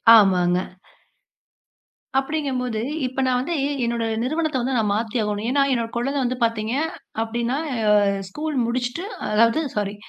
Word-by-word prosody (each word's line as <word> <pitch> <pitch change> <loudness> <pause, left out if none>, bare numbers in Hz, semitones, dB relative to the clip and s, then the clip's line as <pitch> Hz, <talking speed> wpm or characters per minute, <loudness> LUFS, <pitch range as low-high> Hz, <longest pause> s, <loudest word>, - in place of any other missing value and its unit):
ஆமாங்க. 180 -4 +4 1.6
அப்படிங்கும்போது, 265 -6 -1 0.3
இப்ப 260 +1 -3
நான் 250 -1 +2
வந்து 335 +6 -2 0.3
என்னோட 235 -1 -1 0.2
நிறுவனத்த 305 0 0
வந்து 260 +1 -1
நான் 210 -2 +1
மாத்தி 225 +2 -2
ஆகணும். 210 0 -2
ஏன்னா, 280 +1 +2
என்னோட 230 -2 0
கொழந்தை 275 +4 0
வந்து 250 +1 -1
பாத்தீங்க 225 0 -1 0.5
அப்படின்னா 235 +3 -1 0.7
ஸ்கூல் 300 +9 -4
முடிச்சிட்டு, 245 +8 -2 0.3
அதாவது 230 +7 +4
சாரி 205 -1 -1
240 Hz, 125 wpm, -23 LUFS, 220-270 Hz, 1.6 s, ஆமாங்க